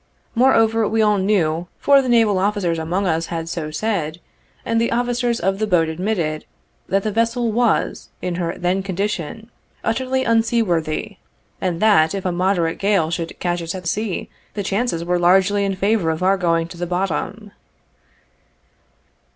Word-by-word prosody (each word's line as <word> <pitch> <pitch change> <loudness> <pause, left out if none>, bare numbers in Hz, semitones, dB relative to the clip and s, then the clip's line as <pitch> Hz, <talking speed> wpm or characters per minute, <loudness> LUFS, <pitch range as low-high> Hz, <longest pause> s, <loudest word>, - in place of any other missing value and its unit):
Moreover, 225 -3 +3
we 220 +1 +2
all 210 -1 +3
knew, 175 -4 +1
for 280 -1 +5
the 255 - -3
naval 225 -5 +4
officers 190 -4 0
among 175 +5 -1
us 165 -2 0
had 165 -1 -4
so 165 -2 -4
said, 165 -2 -2 0.5
and 230 0 +1
the 230 - 0
officers 240 0 0
of 195 +2 0
the 215 - 0
boat 170 -5 +2
admitted, 165 -3 -2 0.5
that 195 0 +1
the 215 - -1
vessel 230 +2 0
was, 235 +1 0
in 180 - -3
her 170 0 -2
then 180 +2 0
condition, 200 +3 -4 0.3
utterly 260 +3 0
unseaworthy, 215 -6 0 0.4
and 175 -3 -1
that, 200 -6 +4
if 195 - -5
a 185 - +1
moderate 175 -2 0
gale 195 -5 +2
should 165 -1 -4
catch 175 -1 -1
us 165 +2 -4
at 185 -1 -7
sea, 210 +2 -2 0.3
the 205 - -2
chances 195 -4 -1
were 175 0 +1
largely 190 +3 +3
in 195 -1 -1
favor 195 -2 +1
of 160 +2 -2
our 190 +1 +4
going 165 -3 +1
to 170 - -10
the 175 0 -3
bottom. 195 +4 -3
195 Hz, 165 wpm, -20 LUFS, 170-220 Hz, 0.5 s, for